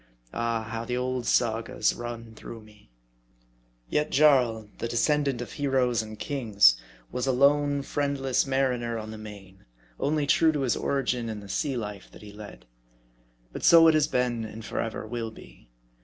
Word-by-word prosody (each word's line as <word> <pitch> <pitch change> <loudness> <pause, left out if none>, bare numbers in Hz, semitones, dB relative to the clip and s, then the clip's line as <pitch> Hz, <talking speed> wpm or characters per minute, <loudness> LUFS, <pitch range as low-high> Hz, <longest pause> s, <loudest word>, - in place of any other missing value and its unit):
Ah! 115 -1 -1
how 115 +1 -5
the 125 +1 -3
old 125 -1 -2
Sagas 115 -1 +1
run 115 -1 -7
through 115 +1 -10
me! 105 - -20 1.0
Yet 150 0 0
Jarl, 125 -7 +3
the - - -2
descendant 140 +2 +1
of 120 - -7
heroes 130 -5 +1
and 110 0 -9
kings, 110 - +3 0.4
was 125 +1 -2
a - - +3
lone, 140 +2 +3
friendless 140 -2 -1
mariner 125 -3 0
on 110 0 -6
the 110 - -8
main, 100 -3 -12 0.4
only 150 0 0
true 160 +3 +4
to 145 - -1
his 130 -3 +1
origin 125 -4 -1
in 110 -1 -5
the 100 - -11
sea 135 +6 -1
life 105 -4 -6
that - - -14
he 105 -1 -11
led. 105 - -11 0.9
But - - -7
so 165 -1 +8
it 160 - +6
has 155 -2 +3
been, 125 -2 0
and 110 0 -8
forever 115 -1 -4
will 115 0 -4
be. 110 - -16
120 Hz, 170 wpm, -27 LUFS, 110-135 Hz, 1.0 s, so